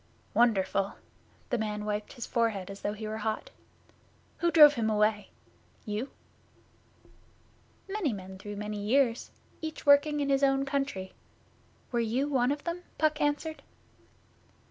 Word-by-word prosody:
'Wonderful!' 195 -4 +2 0.6
The 245 - +1
man 210 -1 -3
wiped 210 0 -3
his 240 - -6
forehead 215 -5 -1
as 195 - -10
though 205 - -1
he 215 0 -6
were 215 +1 -4
hot. 220 - -3 0.9
'Who 345 - +2
drove 300 -3 +9
him 225 -5 0
away? 210 -1 +1 0.6
You?' 215 +5 -3 1.8
'Many 390 -7 -1
men 190 -2 -8
through 205 +1 -7
many 210 0 -4
years, 235 +2 +2 0.3
each 315 -1 -6
working 290 +1 +5
in 285 -1 0
his 275 0 +3
own 270 0 +3
country. 275 -9 -2 0.8
Were 240 - +1
you 235 +5 0
one 260 -3 +2
of 290 0 -3
them?' 340 +1 -3 0.2
Puck 305 -1 +1
answered. 295 +2 -1
235 Hz, 140 wpm, -29 LUFS, 210-285 Hz, 1.8 s, drove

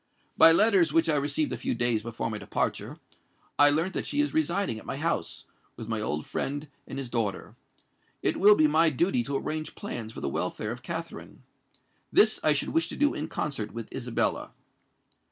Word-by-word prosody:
By 165 - +8
letters 195 -1 +4
which 165 0 +3
I 155 - +2
received 145 +1 -1
a - - -3
few - - -2
days 120 -2 +1
before 115 0 -4
my 105 - -4
departure, - - -3 0.6
I 145 - +8
learnt 160 +6 0
that - - -3
she 290 - -2
is 295 0 +1
residing 200 - 0
at - - -14
my - - -4
house, - - -2 0.3
with 115 - -8
my 110 -1 -2
old 75 -7 -3
friend 145 +2 -4 0.2
and 135 - -7
his 135 -2 -4
daughter. 115 -4 -3 0.7
It - - +1
will 205 +2 +7
be 155 - +4
my 160 +2 +5
duty 155 -1 +1
to 140 +4 -4
arrange 155 +2 -4
plans 115 - -6
for - - -9
the - - -3
welfare 105 +9 -3
of 120 +1 -7
Katherine. 165 +4 -7 0.7
This 215 0 +5
I 155 - +6
should 150 - +1
wish 165 0 0
to - - -7
do 290 0 +2
in 150 - -4
concert 135 -10 -4
with 115 -1 -7
Isabella. 125 -3 -2
145 Hz, 195 wpm, -27 LUFS, 115-165 Hz, 0.7 s, By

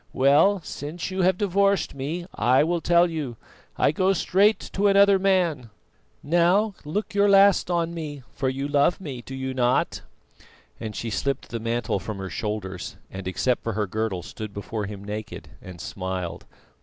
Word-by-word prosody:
Well, 145 +9 +4
since 155 +6 -6
you 190 0 -1
have 185 0 +3
divorced 200 -1 +1
me, 150 +6 -4
I 125 +5 +3
will 170 +1 0
tell 175 +1 +4
you, 150 -8 -4 0.4
I - - +3
go 185 +4 +2
straight 200 +4 +3 0.2
to 205 +1 +2
another 200 0 +5
man. 175 - +1 0.5
Now, 175 +7 +3
look 195 +10 -3
your 200 0 +4
last 195 -2 +5
on 170 -1 0
me; 150 -5 -6
for 130 - -1
you 135 +2 -3
love 145 +3 +2
me, 140 -9 -6
do 135 +2 -8
you 130 0 -3
not?" 125 -1 +1 0.8
and 110 -2 -6
she 115 - -4
slipped 135 +6 -2
the 115 - -4
mantle 115 0 -1
from 110 -2 -6
her 95 -2 -6
shoulders 95 -3 -4
and 95 -1 -7
except 110 +7 0
for 115 - -2
her 105 +1 0
girdle 100 -2 -2
stood 110 -2 -8
before 105 0 -4
him 100 -1 -8
naked, 105 +1 -6
and 90 -2 -10
smiled. 95 -2 -5
140 Hz, 170 wpm, -25 LUFS, 110-180 Hz, 0.8 s, another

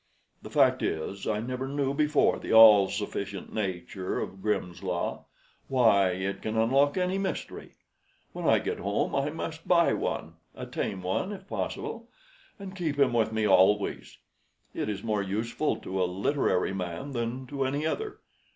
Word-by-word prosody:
The - - -9
fact - - +3
is, 95 +5 -3
I 105 0 0
never 130 +3 -4
knew 140 0 -1
before 150 0 +2
the - - -5
all 110 -3 +9
sufficient 100 -1 -5
nature 95 -2 -3
of 95 - -6
Grimm's 90 -4 -2
Law. 90 -2 -3 0.4
Why, 110 -7 +4
it 95 +2 -3
can 110 0 -3
unlock 135 +7 +3
any 185 +1 0
mystery! 195 -1 -5 0.6
When - - -3
I - - +6
get - - -3
home 100 +2 -1
I 140 +1 +1
must 160 +1 -6
buy 170 -1 +4
one 80 +1 -3 0.2
a - - -6
tame 95 -2 -4
one, 95 - -1
if 195 -1 -9
possible - - -4 0.5
and 195 -1 -9
keep 160 -6 -2
him 135 -4 +3
with 110 -2 +2
me 110 -1 +1
always. 105 +1 +2 0.6
It - - -3
is 100 -1 -4
more 105 -3 0
useful 110 +9 -1
to 95 0 -4
a - - +3
literary 95 -1 0
man 90 +7 -5
than 120 +1 -3
to 135 +1 -3
any 140 +3 -1
other. 415 - -3
110 Hz, 165 wpm, -28 LUFS, 95-140 Hz, 0.6 s, all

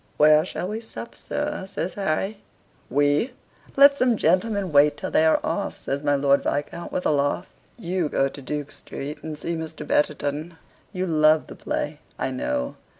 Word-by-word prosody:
"Where 150 +1 +6
shall 180 0 -4
we 220 +2 -4
sup, 225 - -8
sir?" 190 - -3
says 185 -2 -3
Harry. 195 +2 -2 0.5
"WE! 145 - +2 0.4
Let 280 0 +7
some 245 -3 +3
gentlemen 190 +2 +1
wait 145 0 +5
till - - -5
they 160 - +4
are 160 - +4
asked," - - -3
says 140 +1 -2
my 145 -1 +3
Lord 140 0 +3
Viscount 145 +4 -3
with 180 - -2
a - - +4
laugh. 145 +5 0 0.3
"You 180 -6 -1
go 135 - +2
to 140 +1 -9
Duke 145 +2 -4
Street, 150 +2 -7
and 155 -1 -6
see 170 +3 -3
Mr. 160 -1 -6
Betterton. 150 +3 0 0.3
You 185 -2 -2
love 155 -2 +4
the - - -10
play, 150 0 -3 0.2
I - - -2
know. 280 - -2
155 Hz, 175 wpm, -24 LUFS, 145-185 Hz, 0.5 s, Let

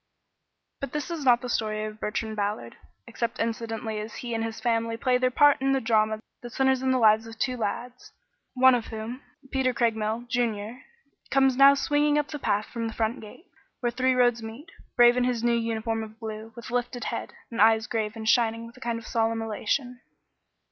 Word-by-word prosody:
But 275 -2 -5
this 300 +3 -3
is 325 -3 -4
not 245 -2 +5
the 250 - -5
story 215 -2 -1
of 215 0 -8
Bertrand 220 +1 -3
Ballard, 200 - -3 0.3
except 235 0 -3
incidentally 225 -1 -3
as 215 +1 -7
he 240 -1 -5
and 225 0 -1
his 225 0 -4
family 230 0 0
play 250 +1 +2
their 255 0 +2
part 290 +2 +4
in 270 0 +2
the 270 - +2
drama 220 -2 +1 0.2
that 240 -1 -9
centers 265 -1 +2
in 260 - 0
the 260 - +3
lives 220 -1 +4
of 225 0 -10
two 255 +1 -1
lads, 245 +3 -5 0.4
one 260 0 +6
of 240 -2 0
whom 225 +4 -6 0.3
Peter 255 -2 +1
Craigmile, 225 -1 0
Junior 235 -1 -2 0.5
comes 270 -1 +3
now 275 +1 +7
swinging 295 +1 +2
up 295 -1 0
the 295 -1 -5
path 210 -4 0
from 230 -1 -4
the 225 - -6
front 225 +2 -1
gate, 220 - -13 0.4
where 240 -1 0
three 255 +1 +1
roads 245 -2 +3
meet, 225 +9 -9 0.2
brave 240 0 +6
in 250 - +2
his 245 -2 0
new 240 0 +3
uniform 225 -1 -1
of 220 0 -9
blue, 220 0 -7
with 235 -1 -9
lifted 245 0 -2
head, - - -4 0.2
and 230 - -1
eyes 220 0 +5
grave 220 -2 -2
and 220 -1 -6
shining 230 -1 +2
with 230 - -13
a - - -16
kind 235 -2 -2
of 230 - -9
solemn 225 0 0
elation. 245 +3 -2
230 Hz, 205 wpm, -26 LUFS, 220-250 Hz, 0.5 s, now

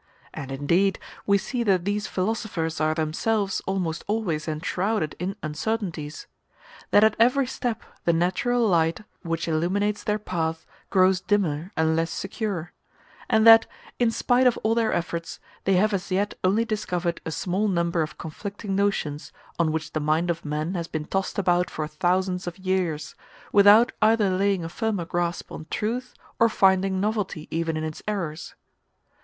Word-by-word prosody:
And, 135 -1 -6
indeed, 170 +8 +2 0.3
we 200 0 +5
see 245 +5 -3
that 190 -6 +2
these 205 0 -1
philosophers 185 -6 -2
are 155 0 +2
themselves 195 +6 0
almost 180 -4 -2
always 180 -8 -1
enshrouded 175 +3 -1
in 185 +3 -3
uncertainties; 160 -2 -3 0.6
that 205 - +5
at 220 -1 +4
every 255 +4 +4
step 245 -2 -3 0.2
the 170 - +3
natural 190 +8 +1
light 165 -2 +2 0.2
which 165 -2 -3
illuminates 190 +6 0
their 210 0 0
path 165 -5 -3 0.2
grows 185 -1 +4
dimmer 180 -4 0
and 160 0 +2
less 165 +1 0
secure; 195 -4 -4 0.6
and 220 0 +4
that, 225 0 +9 0.3
in 240 -2 +4
spite 250 +2 +3
of 245 - +2
all 220 +1 +3
their 230 -1 +1
efforts, 170 -1 -3 0.3
they 195 - +3
have 205 +3 +3
as 195 0 -2
yet 200 +2 0
only 205 +5 +3
discovered 180 -6 -2
a - - -4
small 185 +6 -1
number 170 -3 +1
of 155 - -4
conflicting 200 +5 -5
notions, 190 -7 -1 0.3
on 165 -2 +2
which 160 0 -4
the 155 - 0
mind 155 +3 +1
of 170 0 -5
man 150 +4 -2
has 170 -3 -3
been 155 -2 -4
tossed 195 +3 -2
about 180 -2 +2
for 155 - -3
thousands 180 +3 0
of 175 - -5
years, 180 -6 -1 0.4
without 205 +4 +7
either 215 -2 +4
laying 195 -1 +1
a - - -3
firmer 200 0 -2
grasp 175 0 -2
on 155 - -8
truth, 245 +4 -3 0.2
or 230 - +5
finding 190 -2 +3
novelty 205 -6 -2
even 165 -1 -1
in 155 - -3
its 155 -1 -5
errors. 170 -6 -4
185 Hz, 160 wpm, -25 LUFS, 165-210 Hz, 0.6 s, that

